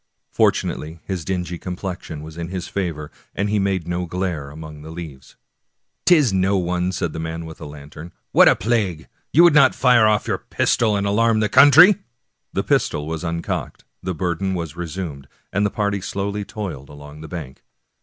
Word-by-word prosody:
Fortunately 80 +2 0
his 95 -4 -3
dingy 90 -1 -3
complexion 90 -4 -6
was 80 0 -10
in 85 0 -5
his 90 -1 -5
favor, 80 -6 -4 0.2
and 100 +1 -1
made 95 -4 -1
no 90 0 -2
glare 85 -5 -3
among 75 0 -10
the 80 - -10
leaves. 80 -5 -9 0.4
" - - -54
'Tis 150 - +5
no 95 +1 +2
one," 90 0 -1
said 85 -4 -3
the 80 - -5
man 80 +1 -4
with 80 -1 -10
the - - -8
lantern. 75 +3 -11
" - - -52
What - - +7
a - - +4
plague! 95 -7 -1 0.2
you 165 - +6
would 175 -3 +7
not 140 -3 +6
fire 125 -4 +5
ofif 105 -1 +2
your - - -1
pistol 110 -3 +1
and 100 0 0
alarm 110 +2 +2
the 105 -1 +1
country! 145 +9 +8 0.3
" - - -54
The - - 0
pistol 75 0 0
was 80 +2 -4
uncocked, 85 0 -4 0.2
the 90 -1 -3
burden 90 +3 -1
was 85 -3 -5
resumed, 85 -5 -6 0.3
and 100 +2 +2
the - - -3
party 100 -1 -1
slowly 100 +2 -3
toiled 90 - -6
along 75 +1 -12
the 80 - -8
bank. 75 -5 -8
90 Hz, 190 wpm, -21 LUFS, 80-100 Hz, 0.4 s, country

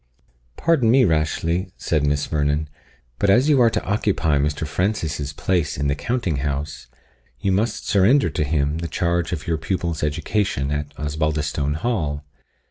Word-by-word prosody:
"Pardon 145 -9 +2
me, 125 +1 +5
Rashleigh," 80 +2 0
said 80 -3 0
Miss 75 0 +1
Vernon, 75 0 0 0.5
"but 100 - +2
as 125 +9 +4
you 140 -4 +5
are 115 - +6
to - - -2
occupy 90 -8 +1
Mr. 75 +2 -1
Francis's 80 -5 -2
place 75 0 -1
in 70 0 0
the - - +2
counting 85 - -2
house, 70 +2 -3 0.5
you 95 - 0
must 105 +5 -1
surrender 110 +9 +4
to - - -1
him 75 +1 0
the 85 - -3
charge 85 0 -1
of 85 -4 -4
your 80 -2 -1
pupil's 85 -2 -2
education 75 -1 -1
at 75 0 -3
Osbaldistone 75 -1 -1
Hall. 75 -8 -2
80 Hz, 155 wpm, -22 LUFS, 75-95 Hz, 0.5 s, are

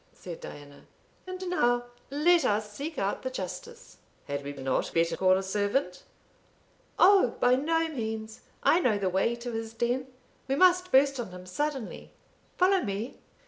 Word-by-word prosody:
said 175 -3 -9
Diana. 145 -1 -11 0.4
"And 370 0 -5
now 245 -9 +2 0.3
let 330 +5 +4
us 210 0 0
seek 300 +8 -5
out - - -1
the - - -3
Justice." 475 -1 -7 0.3
"Had 140 0 -4
we 140 - -5
not 135 -2 -2
better 165 0 +2
call 185 0 +4
a 190 - -2
servant?" 200 0 -1 1.0
"Oh, 375 - +5
by 245 0 +4
no 325 +5 +1
means; 220 -6 -5 0.2
I 340 - +5
know 240 - +2
the 195 -2 0
way 195 +6 +1
to 240 +1 -6
his 225 0 -5
den 245 +3 -1 0.4
we 270 - +1
must 365 +3 +4
burst 275 0 +4
on 235 - -4
him 180 0 -10
suddenly 270 +5 -4 0.5
follow 375 +1 +4
me." 205 +4 -4
240 Hz, 160 wpm, -28 LUFS, 195-320 Hz, 1.0 s, Oh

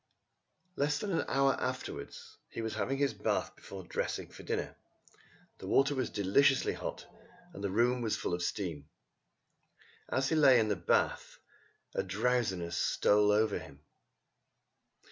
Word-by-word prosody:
Less 145 -1 +1
than 200 +7 -3
an 165 - 0
hour 135 0 +3
afterwards 130 0 -5
he 115 - -5
was 110 - -3
having 135 - -1
his 140 -3 +1
bath 105 0 -1
before 95 -1 -9
dressing - - -3
for - - -12
dinner. - - -3 0.8
The - - -8
water 135 +1 +3
was 130 -3 -1
deliciously 120 +8 +3
hot, - - -6 0.5
and 100 - -8
the 100 - 0
room 120 +5 +2
was 110 -2 0
full - - -3
of 90 - -1
steam. 80 -6 -3 1.2
As 130 0 +1
he - - +1
lay 135 -5 +7
in 110 -1 +1
the 105 - +2
bath 85 -2 0 0.6
a - - 0
drowsiness 95 -9 0
stole 105 0 +3
over 105 0 +2
him. 75 +2 -14
110 Hz, 145 wpm, -32 LUFS, 100-135 Hz, 1.2 s, lay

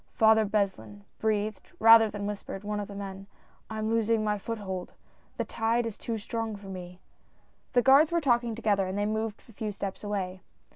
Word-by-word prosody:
"Father 220 0 +5
Beslin," 190 - -2 0.2
breathed, 215 -1 -1
rather 225 0 +8
than 205 -1 -5
whispered, 205 -1 -5
one 210 0 -2
of 205 - -4
the 200 - -9
men, 195 -1 -7 0.2
" - - -34
I 220 - -5
am 215 +1 -1
losing 225 -1 +2
my 210 -1 0
foothold 195 -4 -5 0.2
— - - -35
the - - -1
tide 230 +1 0
is 225 -3 -4
too 230 0 -4
strong 225 +1 -3
for 200 -1 -10
me! 180 -1 -8 0.4
" - - -39
The 245 - +4
guards 275 +5 +6
were 340 - +2
talking 240 -6 +1
together, 205 -4 +1
and 190 +2 -3
they 205 - +1
moved 220 0 -2
a - - -14
few 215 0 -3
steps 200 0 -5
away. 190 -3 -3
210 Hz, 205 wpm, -28 LUFS, 200-225 Hz, 0.4 s, rather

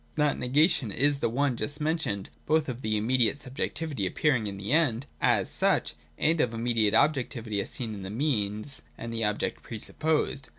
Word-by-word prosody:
That 150 -2 +1
negation 135 - +2
is 140 +5 +2
the - - +1
one 135 +2 +1
just 140 +7 -2
mentioned 150 - -1 0.2
both 155 0 +2
of 125 -1 -5
the 110 -2 0
immediate 120 +4 +2
subjectivity 140 -3 -3
appearing 125 - +1
in 100 -1 -5
the 100 +4 -4
End 145 -6 +2 0.2
as - - +3
such, - - +1 0.2
and 160 0 +2
of 125 - +2
the 115 - -7
immediate 115 -2 +2
objectivity 120 -7 +1
as - - -6
seen 115 -5 -4
in 100 - -7
the 95 - -6
means 110 0 -1 0.2
and 115 0 -6
the 115 0 -1
objects 105 -1 -1
pre 115 - -7
supposed. 150 +3 0
125 Hz, 185 wpm, -28 LUFS, 110-145 Hz, 0.2 s, as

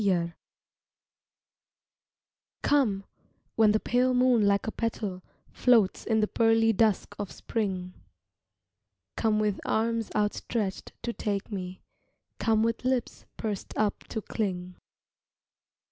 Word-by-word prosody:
COME 175 -4 +1 2.3
COME, 230 -10 +2 0.5
when 220 -2 +5
the 215 - +2
pale 250 +2 +2
moon 250 -4 +4
like 200 0 +2
a 220 - -2
petal 210 -5 -3 0.3
Floats 230 -6 +3
in 220 -1 +3
the 210 - +2
pearly 225 0 +3
dusk 215 -1 +1
of 205 -2 -4
spring, 185 -5 -3 1.2
Come 220 -2 +2
with 210 -2 0
arms 230 0 0
outstretched 210 -1 -1
to 235 - -2
take 205 -1 -3
me, 185 -2 -5 0.6
Come 220 -1 +2
with 230 +1 -1
lips 255 -1 -1
pursed 210 -4 -4
up 210 -1 0
to 220 - -4
cling. 185 -4 -3
215 Hz, 115 wpm, -28 LUFS, 200-230 Hz, 2.3 s, when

